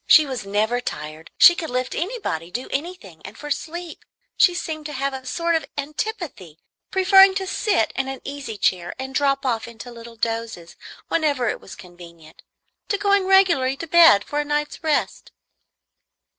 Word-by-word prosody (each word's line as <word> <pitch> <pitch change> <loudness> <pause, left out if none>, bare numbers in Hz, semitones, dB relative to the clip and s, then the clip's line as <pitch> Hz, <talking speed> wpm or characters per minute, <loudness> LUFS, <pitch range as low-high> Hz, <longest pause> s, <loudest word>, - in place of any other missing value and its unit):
She 310 - +7
was 255 -7 -6
never 215 +5 0
tired; 155 -7 -7
she 345 - +9
could 330 -2 -5
lift 255 +1 -2
anybody, 340 - -3
do 245 +8 -5
anything; 275 - -5
and 205 +3 -10
for 295 0 -8
sleep 335 +4 -5 0.3
she 360 -4 +4
seemed 310 -3 -5
to 300 - -8
have 275 0 -2
a 260 -1 -7
sort 340 +3 -1
of 325 - -1
antipathy, 295 - -5 0.3
preferring 385 0 +6
to 385 -1 -2
sit 370 - 0
in 270 - -1
an 270 0 -5
easy 280 -6 -6
chair 180 -3 0
and 265 0 -6
drop 275 -1 +1
off 230 -3 -1
into 235 +1 -10
little 230 0 -11
dozes, 225 -6 -4 0.3
whenever 285 -7 0
it - - -4
was - - -11
convenient, 170 -3 -15 0.5
to 410 - +1
going 400 -1 +2
regularly 335 -9 +4
to 330 - -6
bed 325 -11 +6
for 295 - -3
a - - +1
night's 295 +3 -3
rest. 310 -2 -1
275 Hz, 170 wpm, -22 LUFS, 225-335 Hz, 0.5 s, she